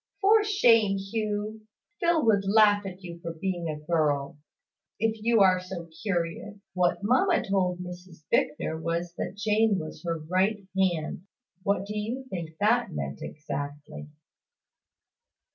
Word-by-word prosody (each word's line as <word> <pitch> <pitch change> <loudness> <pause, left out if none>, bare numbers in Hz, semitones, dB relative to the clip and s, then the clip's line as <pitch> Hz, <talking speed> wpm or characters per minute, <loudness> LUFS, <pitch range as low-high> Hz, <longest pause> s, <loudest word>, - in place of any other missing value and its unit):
"For 420 +2 +5
shame, 230 - +4
Hugh! 215 +1 -3 0.3
Phil 340 -4 +2
would 205 -3 +4
laugh 205 0 +4
at 185 0 -9
you 170 -1 -8
for 170 -1 -5
being 175 0 -3
a 155 - -3
girl 150 -2 0 0.6
if 220 0 -1
you 230 -1 +3
are 185 -1 +5
so 180 -2 -7
curious. 195 +1 -2 0.2
What 180 +1 +1
mamma 330 - +3
told 185 -2 +1
Mrs 180 -2 -10
Bicknor 160 +1 0
was 170 +1 -2
that - - -3
Jane 210 0 +2
was 155 -3 -6
her 165 -1 -1
right 185 +6 0
hand. 180 -1 0 0.3
What 195 0 0
do 210 +1 -6
you 230 +6 -3
think 165 -3 -5
that 225 +4 +2
meant 70 -1 -5
exactly?" 145 0 -6
190 Hz, 140 wpm, -27 LUFS, 170-215 Hz, 0.6 s, For